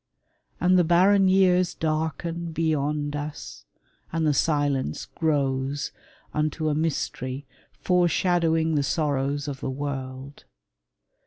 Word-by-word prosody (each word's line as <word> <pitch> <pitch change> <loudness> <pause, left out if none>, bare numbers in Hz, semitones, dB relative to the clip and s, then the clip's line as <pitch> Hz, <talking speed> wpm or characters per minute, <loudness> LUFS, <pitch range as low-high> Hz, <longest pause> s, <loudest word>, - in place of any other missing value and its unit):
And 180 0 +4
the - - +5
barren 190 +4 +4
years 185 -1 +3
Darken 160 +2 -2
beyond 150 -2 0
us, 145 - -7 0.5
and 165 -1 0
the 150 - +3
silence 145 - 0
grows 140 -3 -1 0.4
Unto 155 +1 0
a - - +1
mystery 145 -3 -2 0.4
foreshadowing 170 -2 +2
The 145 - +2
sorrows 140 -1 -1
of 140 -2 -5
the - - -3
world. 135 0 -6
155 Hz, 105 wpm, -25 LUFS, 140-165 Hz, 0.5 s, the